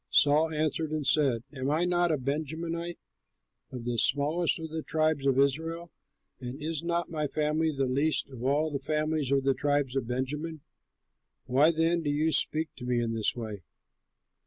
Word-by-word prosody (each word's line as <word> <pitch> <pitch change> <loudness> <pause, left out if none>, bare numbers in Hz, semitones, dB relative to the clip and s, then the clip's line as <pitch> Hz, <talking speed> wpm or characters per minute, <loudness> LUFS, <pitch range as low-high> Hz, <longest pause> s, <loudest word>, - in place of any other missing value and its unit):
Saul 150 +3 +4
answered 155 0 -1
and 155 -2 -2
said, 135 -5 +2
"Am 130 -1 -2
I 160 +4 +2
not 175 -1 +2
a 155 - +2
Benjamite, 160 +5 -3 0.7
of 125 -2 -7
the 120 -1 -1
smallest 150 +7 +2
of 160 -1 -7
the 160 0 -3
tribes 155 -3 0
of 135 -1 +3
Israel, 160 +5 0 0.5
and 125 +2 -6
is 155 0 -3
not 170 0 -1
my 155 -2 -1
family 155 +2 0
the 135 -2 0
least 140 +3 +1
of 125 -2 -8
all 150 +4 +1
the 140 - -2
families 155 0 -1
of 135 -1 +3
the 135 0 +3
tribe 145 0 +1
of 130 -4 -1
Benjamin? 145 +6 -3 0.8
Why 140 +5 +4
then 165 +1 +2
do 150 - -2
you 150 +2 +1
speak 155 0 +1
to 125 - -9
me 125 -1 +1
in 115 -1 -1
this 110 -2 0
way?" 110 -5 -6
150 Hz, 180 wpm, -29 LUFS, 135-160 Hz, 0.8 s, Saul